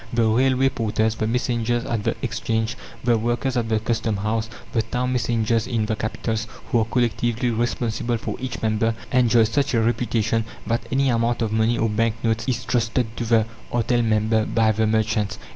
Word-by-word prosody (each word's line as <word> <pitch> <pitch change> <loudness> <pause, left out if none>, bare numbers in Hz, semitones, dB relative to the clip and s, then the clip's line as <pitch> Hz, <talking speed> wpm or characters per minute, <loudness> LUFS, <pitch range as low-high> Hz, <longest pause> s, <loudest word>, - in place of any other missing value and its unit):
The 115 -1 +2
railway 130 +3 +3
porters, 110 -3 0
the 110 -1 -2
messengers 120 0 0
at 115 -3 -2
the - - 0
Exchange, 110 +1 -1 0.3
the 120 -2 +3
workers 120 +3 -1
at 115 -2 0
the 110 -1 +2
Custom 110 -1 -1
House, 110 +2 -1 0.2
the 115 - +2
town 125 +3 -2
messengers 115 -2 +1
in 115 -4 0
the 110 0 -1
capitals, 110 +1 -3 0.2
who 120 - +3
are 110 - +2
collectively 120 0 0
responsible 120 0 -1
for - - -4
each 130 -2 -5
member, 110 +1 +1 0.2
enjoy 120 -2 +4
such 125 +4 +1
a - - +4
reputation 115 -1 +1 0.2
that 115 0 -1
any 135 0 +2
amount 115 0 +1
of 110 - -1
money 110 +2 +2
or 115 - +2
bank 110 +1 +1
notes 115 0 0
is 120 -3 -1
trusted 115 -1 0
to 120 - -3
the 110 -1 +3 0.3
artel 120 0 +1
member 110 0 +2
by 110 0 +2
the 110 +1 +1
merchants. 110 -1 0
115 Hz, 185 wpm, -23 LUFS, 110-120 Hz, 0.3 s, enjoy